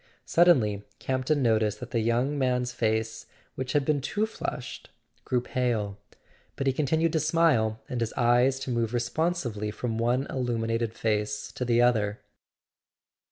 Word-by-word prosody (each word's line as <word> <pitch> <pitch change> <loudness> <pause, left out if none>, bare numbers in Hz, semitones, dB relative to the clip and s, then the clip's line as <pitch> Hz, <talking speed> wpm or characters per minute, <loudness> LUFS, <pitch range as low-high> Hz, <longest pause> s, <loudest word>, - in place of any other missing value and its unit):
Suddenly 125 - +4 0.2
Campton 130 +2 0
noticed 110 -3 +2
that 125 0 -8
the 115 - +1
young 120 +6 +1
man's 125 -2 0
face, 110 -2 -1 0.3
which 130 -1 -4
had 145 -2 +2
been 145 -2 +1
too 210 +10 0
flushed, 130 - -6 0.4
grew 125 -1 +1
pale; 115 -6 -1 0.6
but 135 - -3
he 135 - +2
continued 160 +3 +1
to 160 - +2
smile, 155 -9 +2
and 125 -2 -3
his 115 - -1
eyes 125 +2 +3
to 130 - -3
move 120 0 0
responsively 120 -4 -1
from 115 +1 -3
one 125 +3 +1
illuminated 115 -2 -1
face 105 -1 -1
to - - -4
the 120 0 +3
other. 110 -4 +2
120 Hz, 150 wpm, -27 LUFS, 110-135 Hz, 0.6 s, Suddenly